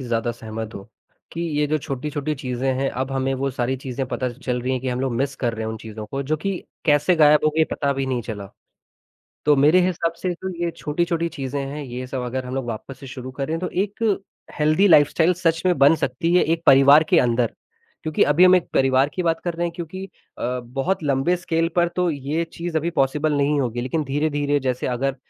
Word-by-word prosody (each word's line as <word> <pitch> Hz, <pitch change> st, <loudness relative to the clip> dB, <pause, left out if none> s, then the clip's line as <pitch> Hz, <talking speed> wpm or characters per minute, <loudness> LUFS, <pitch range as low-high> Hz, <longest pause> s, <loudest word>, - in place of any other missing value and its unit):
ही -, -, -6 dB
ज़्यादा 120 Hz, -1 st, -1 dB
सहमत 110 Hz, -1 st, -7 dB
हूँ 100 Hz, -, -9 dB, 0.5 s
कि 165 Hz, -, -5 dB, 0.2 s
ये 150 Hz, -, +2 dB
जो 155 Hz, +1 st, 0 dB
छोटी-छोटी 145 Hz, +1 st, -3 dB
चीज़ें 130 Hz, -1 st, -2 dB
हैं, 135 Hz, 0 st, +1 dB
अब 130 Hz, +1 st, -3 dB
हमें 135 Hz, 0 st, 0 dB
वो 135 Hz, +1 st, -1 dB
सारी 130 Hz, 0 st, -1 dB
चीज़ें 130 Hz, 0 st, -4 dB
पता 130 Hz, 0 st, -2 dB
चल 125 Hz, 0 st, -3 dB
रही 130 Hz, -, -1 dB
हैं 130 Hz, -, -1 dB
कि 130 Hz, -, -3 dB
हम 125 Hz, 0 st, -2 dB
लोग 130 Hz, -2 st, -1 dB
मिस 140 Hz, +2 st, -1 dB
कर 120 Hz, -3 st, -1 dB
रहे 110 Hz, 0 st, -4 dB
हैं 110 Hz, -, -3 dB
उन 110 Hz, -, -5 dB
चीज़ों 110 Hz, 0 st, -8 dB
को 135 Hz, +5 st, -4 dB
जो 150 Hz, +3 st, -1 dB
कि 195 Hz, -2 st, 0 dB, 0.3 s
कैसे 150 Hz, +4 st, +4 dB
गायब 150 Hz, -1 st, +5 dB
हो 155 Hz, -, +4 dB
गई 160 Hz, -, +5 dB
पता 140 Hz, -1 st, 0 dB
भी 135 Hz, -1 st, -2 dB
नहीं 125 Hz, -2 st, -1 dB
चला, 105 Hz, -3 st, -6 dB, 1.0 s
तो 150 Hz, -1 st, +5 dB
मेरे 150 Hz, +6 st, +5 dB
हिसाब 170 Hz, -2 st, -1 dB
से 185 Hz, -, 0 dB
तो 190 Hz, +2 st, -6 dB, 0.2 s
ये 170 Hz, -, 0 dB
छोटी-छोटी 170 Hz, +2 st, -1 dB
चीज़ें 135 Hz, +1 st, -3 dB
हैं, 145 Hz, +2 st, -5 dB
ये 125 Hz, 0 st, -6 dB
सब 130 Hz, 0 st, -4 dB
अगर 130 Hz, +1 st, -3 dB
हम 125 Hz, -, -5 dB
लोग 135 Hz, -2 st, -3 dB
वापस 115 Hz, +4 st, -6 dB
से 135 Hz, -, -9 dB
शुरू 130 Hz, -1 st, -7 dB
करें 155 Hz, +4 st, -1 dB
तो 180 Hz, -, -3 dB, 0.2 s
एक 205 Hz, +2 st, -10 dB, 0.6 s
हेल्दी 155 Hz, +6 st, +4 dB
लाइफ़स्टाइल 160 Hz, +2 st, +5 dB
सच 165 Hz, -2 st, 0 dB
में 180 Hz, -1 st, +3 dB
बन 140 Hz, +3 st, +6 dB
सकती 170 Hz, +2 st, -1 dB
है 180 Hz, -, +5 dB
एक 165 Hz, +1 st, 0 dB
परिवार 140 Hz, +3 st, +7 dB
के 175 Hz, -, +5 dB
अंदर 120 Hz, -1 st, +1 dB, 0.5 s
क्योंकि 155 Hz, -1 st, +1 dB
अभी 150 Hz, +5 st, +5 dB
हम 185 Hz, 0 st, +7 dB
एक 175 Hz, -, -1 dB
परिवार 135 Hz, +1 st, +3 dB
की 185 Hz, -, -1 dB
बात 165 Hz, -1 st, 0 dB
कर 175 Hz, -1 st, -2 dB
रहे 170 Hz, +1 st, -1 dB
हैं 170 Hz, -, -4 dB
क्योंकि 180 Hz, +3 st, -6 dB, 0.3 s
अ, 125 Hz, +1 st, -2 dB, 0.2 s
बहुत 185 Hz, +6 st, 0 dB
लंबे 140 Hz, +5 st, +2 dB
स्केल 165 Hz, -1 st, 0 dB
पर 175 Hz, 0 st, +4 dB
तो 180 Hz, -1 st, +2 dB
ये 145 Hz, +3 st, -2 dB
चीज़ 170 Hz, -1 st, -4 dB
अभी 160 Hz, +2 st, 0 dB
पॉसिबल 150 Hz, 0 st, +1 dB
नहीं 145 Hz, +1 st, +2 dB
होगी, 120 Hz, -2 st, -2 dB
लेकिन 140 Hz, +6 st, -2 dB
धीरे-धीरे 145 Hz, +1 st, 0 dB
जैसे 130 Hz, -1 st, -2 dB
अगर 130 Hz, +2 st, -1 dB
140 Hz, 230 wpm, -22 LUFS, 130-165 Hz, 1.0 s, परिवार